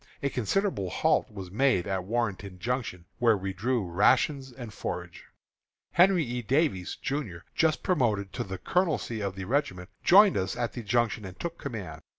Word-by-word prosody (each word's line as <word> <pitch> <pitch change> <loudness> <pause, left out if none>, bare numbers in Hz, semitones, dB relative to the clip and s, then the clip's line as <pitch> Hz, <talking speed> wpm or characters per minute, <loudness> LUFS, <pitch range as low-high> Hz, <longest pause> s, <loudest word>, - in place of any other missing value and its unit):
A 140 - 0
considerable 125 - 0
halt - - +1
was 95 -4 -8
made 115 -4 +2
at 95 -2 -2
Warrenton 100 -4 -2
Junction, 115 -4 -3
where 115 -3 +4
we 95 0 -4
drew 115 +3 0
rations 130 - +2
and 120 -4 -9
forage. - - -6 0.7
Henry 180 -1 +5
E. 125 -1 -3
Davies, 125 - 0
Jr., 135 - -4
just 160 -1 +1
promoted 105 - +1
to - - -2
the 95 0 -6
colonelcy 160 - 0
of 100 -2 -3
the 95 -1 -5
regiment, 95 -7 -1
joined 200 +2 +7
us 95 0 -1
at 120 -1 -2
the 120 - -5
Junction, 115 0 0
and 95 -1 -9
took 170 -1 -5
command. 95 - -6
115 Hz, 165 wpm, -28 LUFS, 95-135 Hz, 0.7 s, joined